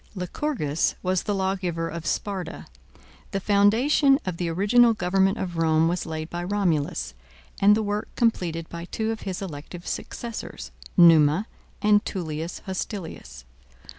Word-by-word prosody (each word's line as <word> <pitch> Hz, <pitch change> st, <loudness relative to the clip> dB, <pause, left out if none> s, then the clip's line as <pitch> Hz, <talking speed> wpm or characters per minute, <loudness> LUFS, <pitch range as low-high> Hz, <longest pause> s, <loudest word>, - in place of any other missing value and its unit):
Lycurgus 180 Hz, -, -1 dB
was 185 Hz, -1 st, +1 dB
the 205 Hz, -, -2 dB
lawgiver 185 Hz, -3 st, -1 dB
of 165 Hz, -1 st, -6 dB
Sparta. 195 Hz, -3 st, -3 dB, 0.6 s
The 195 Hz, -, -2 dB
foundation 225 Hz, +9 st, +4 dB
of 185 Hz, -3 st, -3 dB
the 175 Hz, -1 st, -1 dB
original 220 Hz, +7 st, +4 dB
government 195 Hz, +2 st, +2 dB
of 175 Hz, -3 st, -4 dB
Rome 160 Hz, 0 st, +3 dB
was 175 Hz, +1 st, -2 dB
laid 155 Hz, -1 st, -4 dB
by 175 Hz, +1 st, -5 dB
Romulus, 165 Hz, -, -1 dB, 0.5 s
and 205 Hz, +1 st, +6 dB
the 220 Hz, -, 0 dB
work 205 Hz, 0 st, -2 dB
completed 170 Hz, -8 st, 0 dB
by 170 Hz, 0 st, -7 dB
two 220 Hz, +4 st, -2 dB
of 225 Hz, -, -5 dB
his 185 Hz, +1 st, -4 dB
elective 170 Hz, +1 st, -8 dB
successors, 235 Hz, -2 st, -6 dB, 0.3 s
Numa 165 Hz, +1 st, +6 dB, 0.4 s
and 210 Hz, 0 st, +5 dB
Tullius 165 Hz, -2 st, -4 dB
Hostilius. 175 Hz, -, -6 dB
185 Hz, 135 wpm, -25 LUFS, 165-205 Hz, 0.6 s, and